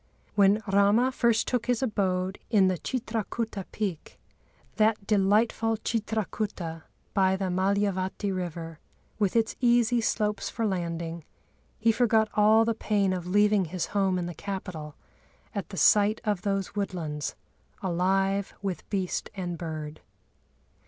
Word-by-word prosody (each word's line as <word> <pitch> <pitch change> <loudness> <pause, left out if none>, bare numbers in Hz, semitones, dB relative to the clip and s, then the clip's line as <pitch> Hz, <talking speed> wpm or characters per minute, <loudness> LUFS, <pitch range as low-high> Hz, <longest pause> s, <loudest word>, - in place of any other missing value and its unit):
"When 205 +1 +4
Râma 205 +5 +3
first 235 -3 +2
took 250 -1 -1
his 245 +1 +1
abode 190 -5 -1
in 195 -5 +4
the 185 -3 -1
Chitrakuta 225 -4 -3
peak, 195 -7 -4 0.6
that 215 -1 +2
delightful 215 +2 +2
Chitrakuta, 210 -7 -3 0.3
by 190 -2 +3
the 190 -1 -2
Mâlyavati 195 +1 0
river, 165 -3 -5 0.4
with 205 -1 +1
its 225 -1 +2
easy 240 -1 +3
slopes 210 -2 0
for 230 - -2
landing, 170 -3 -3 0.5
he 225 +1 +3
forgot 220 -2 +3
all 215 +2 +5
the 230 - +1
pain 205 -3 +1
of 180 -1 -4
leaving 205 0 +3
his 175 +1 -3
home 195 -2 +2
in 175 - -2
the 175 - -5
capital 175 -6 -6 0.6
at 200 -7 -4
the 190 - -8
sight 210 +3 +5
of 205 -4 0
those 195 -2 -1
woodlands, 165 -7 -3 0.5
alive 195 +2 +1
with 190 -3 -4
beast 190 -3 -2
and 180 -3 -3
bird." 155 -2 -6
200 Hz, 130 wpm, -27 LUFS, 185-220 Hz, 0.6 s, all